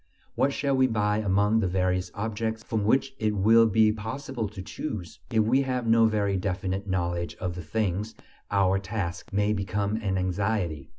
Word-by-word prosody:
What 140 - +2
shall 140 0 0
we 130 0 +4
buy 105 -3 +1
among 105 +2 +2
the 100 - +1
various 90 0 0
objects 110 +1 -3
from 110 -3 -2
which 135 +4 +2
it 110 -1 0
will 115 +3 +5
be 110 0 +4
possible 115 +1 -4
to 100 -2 -8
choose? 100 - -6
If 110 -3 +3
we 125 +5 +3
have 125 -2 -2
no 115 0 +5
very 100 -3 0
definite 95 +1 -2
knowledge 85 -2 -2
of 90 -2 -4
the 90 - -6
things, 105 +4 -2 0.3
our 95 -1 +2
task 95 +2 -4
may 105 +1 +1
become 100 +1 -1
an 100 -4 -1
anxiety. 90 -5 -1
105 Hz, 175 wpm, -27 LUFS, 95-110 Hz, 0.3 s, will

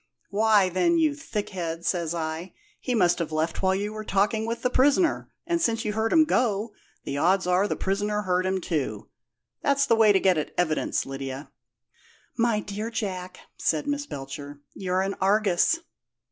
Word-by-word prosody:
'Why, 210 -1 +4
then, 185 - +2
you 315 -2 +3
thickhead,' 195 - -4
says 170 -2 0
I, 160 +2 -4 0.2
'he 250 - -2
must 180 -5 +3
have 165 -2 -3
left 160 +1 -1
while 190 0 +2
you 205 +2 -3
were 215 0 -6
talking 215 +2 +1
with 230 0 -4
the 250 - +1
prisoner; 290 +7 +2 0.2
and 340 0 0
since 225 -5 0
you 210 - -1
heard 220 +1 0
him 320 -1 +6
go, 225 -6 0 0.3
the 140 0 -3
odds 185 +4 +3
are 180 +3 +2
the - - -1
prisoner 205 +2 -1
heard 185 -1 +1
him, 190 0 0
too.' 155 -6 -3 0.5
That's 280 0 +2
the 230 - +3
way 220 -2 +6
to 195 - +4
get 185 -4 +3
at 150 - -5
evidence, 160 -3 0
Lydia." 135 +1 -6 0.8
"My 230 -2 +1
dear 210 +2 -5
Jack," 185 -6 -5 0.2
said 155 -2 0
Miss 285 0 -2
Belcher, 140 - -7
"you're 185 -1 -1
an 195 +1 -1
Argus!" 200 - +3
195 Hz, 175 wpm, -26 LUFS, 175-225 Hz, 0.8 s, him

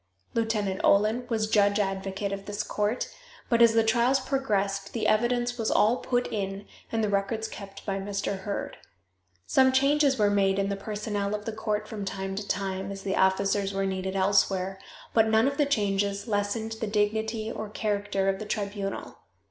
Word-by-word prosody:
Lieutenant 215 -4 0
Olin 220 +5 +3
was 220 -2 +1
judge 205 -1 +3
advocate 195 0 -2
of 195 0 -5
this 205 0 -2
court, 210 +4 -1 0.4
but 235 -1 +3
as 230 -1 +7
the 225 - +5
trials 235 +4 +3
progressed 205 -8 -1
the 225 -2 -2
evidence 240 +2 +1
was 225 - 0
all 225 +4 +4
put 245 -1 0
in 195 -1 -3 0.3
and 225 -1 0
the - - +2
records 205 +3 -1
kept 195 -1 -10
by 195 -1 -1
Mr. 200 0 -3
Heard. 200 +1 -4 0.7
Some 260 - +4
changes 275 +1 +3
were 205 -2 +3
made 195 -1 +2
in 195 0 0
the 200 - -1
personnel 205 0 -3
of 210 0 -6
the 225 - -3
court 215 -1 -2
from 215 -2 -5
time 195 0 -4
to 200 +1 -5
time 190 0 -2
as 195 0 -7
the 190 -1 -1
officers 195 +1 +2
were 195 0 0
needed 190 0 -2
elsewhere, 195 -1 +2 0.3
but 225 -1 +4
none 220 +3 +4
of 280 0 -1
the 290 - +3
changes 200 -4 0
lessened 210 +1 -1
the 220 - -1
dignity 220 +1 0
or 215 -2 -5
character 205 -2 -1
of 195 0 +1
the 215 - -5
tribunal. 200 - -4
205 Hz, 180 wpm, -27 LUFS, 195-225 Hz, 0.7 s, as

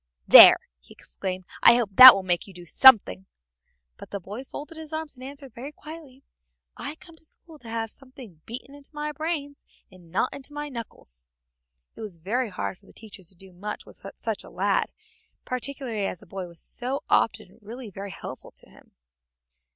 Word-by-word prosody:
"There!" - - +11 0.2
he - - -18
exclaimed, 185 -1 -6 0.2
"I 235 - +8
hope 235 -4 -1
that 255 +3 +12
will 195 - -3
make 175 0 -1
you 195 - -14
do 175 -1 -12
something." 175 - +5 0.7
But - - -12
the 200 - -5
boy 205 +7 -8
folded 295 +4 -10
his 320 -1 -9
arms 315 -1 -5
and 255 -1 -14
answered 275 -2 -8
very 265 +6 -8
quietly, 300 -4 -13 0.5
"I 300 - -7
came 335 +1 -17
to - - -22
school 320 0 -9
to 235 - -12
have 225 -1 -4
something 255 - -15
beaten 250 +4 -8
into 285 -1 -16
my 300 0 -4
brains 295 -2 -5 0.3
and 180 -2 -18
not 185 +8 -1
into 280 +1 -10
my 295 0 -5
knuckles." 65 - -10 0.7
It - - -11
was 205 -6 -8
very 225 +9 -2
hard 180 -1 -5
for - - -25
the - - -18
teacher 215 -3 -12
to 185 +1 -9
do 190 +1 -16
much 210 +4 -7
with - - -18
such - - -4
a - - -13
lad, - - -1 0.5
particularly 255 -5 -4
as 180 - -6
the - - -16
boy 190 0 -7
was 170 -1 -10
so 255 +3 -3
often 205 -3 0
really 225 +1 -10
very 200 +2 -8
helpful - - -9
to - - -11
him. - - -21
235 Hz, 190 wpm, -25 LUFS, 190-280 Hz, 0.7 s, that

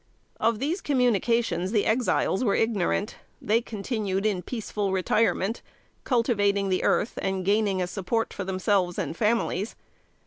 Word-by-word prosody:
Of 225 0 +2
these 310 - -2
communications 230 - +1
the 215 -3 +2
Exiles 225 -2 +1
were 205 - +2
ignorant. 210 -2 0 0.2
They 220 +3 +1
continued 210 -3 -3
in 200 -4 +1
peaceful 210 -3 -3
retirement, 195 +3 +1 0.4
cultivating 205 -5 +1
the 185 - 0
earth, 225 - +1
and 190 -1 -2
gaining 200 -2 +2
a - - 0
support 195 +5 -2
for 200 - -4
themselves 185 -1 0
and - - -3
families. 215 -1 0
205 Hz, 135 wpm, -26 LUFS, 190-230 Hz, 0.4 s, Of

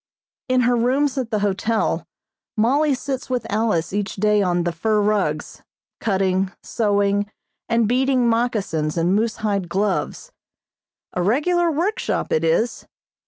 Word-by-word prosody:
In 255 0 +3
her 245 0 +3
rooms 260 +4 +1
at 250 -3 -3
the 215 - 0
hotel 215 +3 0 0.5
Mollie 275 +6 +3
sits 265 0 -5
with 250 -1 -1
Alice 210 -6 0
each 205 -1 -2
day 210 +1 +2
on 175 -2 +1
the 175 - 0
fur 210 +6 0
rugs, 200 -8 -1 0.4
cutting, 190 -2 0
sewing 205 -1 +1 0.4
and 230 -1 +2
beading 255 +1 +2
moccasins 210 -10 0
and 170 +2 +2
moosehide 210 -3 -1
gloves. 205 - -1 0.8
A 180 - -1
regular 335 - +2
workshop 345 +8 -1
it 155 - +1
is. 170 +9 0
215 Hz, 130 wpm, -21 LUFS, 195-245 Hz, 0.8 s, In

